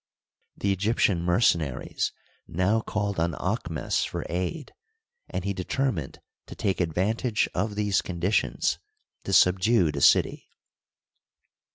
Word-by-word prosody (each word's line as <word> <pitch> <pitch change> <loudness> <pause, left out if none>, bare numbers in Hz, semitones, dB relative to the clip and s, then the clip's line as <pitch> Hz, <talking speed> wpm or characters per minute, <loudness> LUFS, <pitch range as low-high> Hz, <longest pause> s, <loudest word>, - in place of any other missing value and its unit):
The 100 - 0
Egyptian 100 -2 +1
mercenaries 85 - +1 0.4
now 95 +6 +1
called 100 -4 -2
on 85 0 +1
Aahmes 90 -5 -1
for - - -4
aid, 90 - -3 0.6
and 90 - -3
he 100 +1 -1
determined 95 - -2 0.3
to - - -9
take 95 -2 -1
advantage 105 +7 0
of 100 +3 -1
these 105 -2 +1
conditions 90 +3 0 0.5
to - - -3
subdue 95 -1 +4
the 70 -1 -4
city. - - +4
95 Hz, 110 wpm, -26 LUFS, 85-105 Hz, 0.6 s, subdue